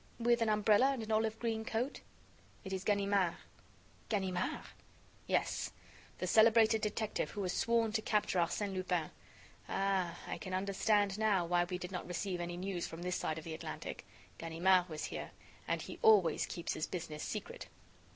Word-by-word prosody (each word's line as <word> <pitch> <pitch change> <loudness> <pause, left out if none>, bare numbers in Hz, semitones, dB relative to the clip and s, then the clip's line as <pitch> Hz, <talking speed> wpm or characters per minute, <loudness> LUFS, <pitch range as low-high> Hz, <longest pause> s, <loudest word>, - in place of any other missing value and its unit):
"With 235 0 +2
an 225 - +2
umbrella 210 +3 +4
and 245 -4 -4
an 220 - -5
olive 220 0 +1
green 225 -1 -1
coat?" 245 +4 -2 0.6
"It 190 -2 -5
is 190 0 -3
Ganimard." 200 -3 +2 0.7
"Ganimard?" 190 -4 -1 0.6
"Yes, - - 0 0.4
the - - -2
celebrated 220 0 +5
detective 215 0 -1
who 205 - -4
has 180 - -1
sworn 230 -1 +2
to 220 0 0
capture 210 -4 +1
Arsène 190 +4 0
Lupin. 180 -4 -1 0.6
Ah! 190 -3 0
I - - -4
can 185 -2 -4
understand 200 +1 +1
now 205 -5 +3
why 175 +1 +2
we 180 +1 -3
did 180 +1 -6
not 180 -2 -4
receive 180 0 -2
any 175 0 -4
news 185 -1 -3
from 165 +1 -8
this 180 0 -1
side 155 - -2
of 160 - -6
the 160 - -5
Atlantic. - - -6 0.4
Ganimard 175 +2 +3
was 155 -1 -5
here! - - -5 0.4
and - - -1
he - - -8
always 190 -8 +5
keeps 170 - -3
his 155 - -2
business 160 -4 -5
secret." - - -5
195 Hz, 170 wpm, -35 LUFS, 175-220 Hz, 0.7 s, celebrated